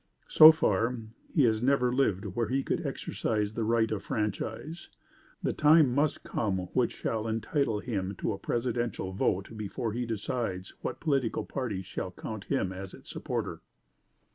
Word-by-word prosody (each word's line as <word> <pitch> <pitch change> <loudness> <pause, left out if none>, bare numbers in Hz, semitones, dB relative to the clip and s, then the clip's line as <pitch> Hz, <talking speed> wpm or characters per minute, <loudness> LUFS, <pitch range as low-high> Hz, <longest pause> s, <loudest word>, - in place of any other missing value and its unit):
So 155 0 +11
far, 115 -5 +1 0.3
he 150 - +3
has 110 -2 +3
never 125 -1 +3
lived 110 -7 +1
where 105 +4 -1
he 135 +4 0
could - - -1
exercise 105 -1 -2
the 115 - -2
right 115 0 +2
of 105 -3 -1
franchise. 110 - -3 0.5
The - - +1
time 150 -3 +5
must 145 +3 +1
come 100 -4 -1 0.2
which 125 -2 +2
shall 110 0 -2
entitle 115 0 0
him 100 -5 -3
to - - -2
a - - -7
Presidential 120 -5 -2
vote 95 0 0
before 110 +2 -3
he 120 +1 -2
decides 105 -4 -3
what - - -4
political 135 -7 0
party 110 -8 -3
shall 95 - -4
count 105 +3 -7
him 95 -9 0
as 95 0 -7
its - - -12
supporter. - - -3
115 Hz, 160 wpm, -29 LUFS, 105-130 Hz, 0.5 s, So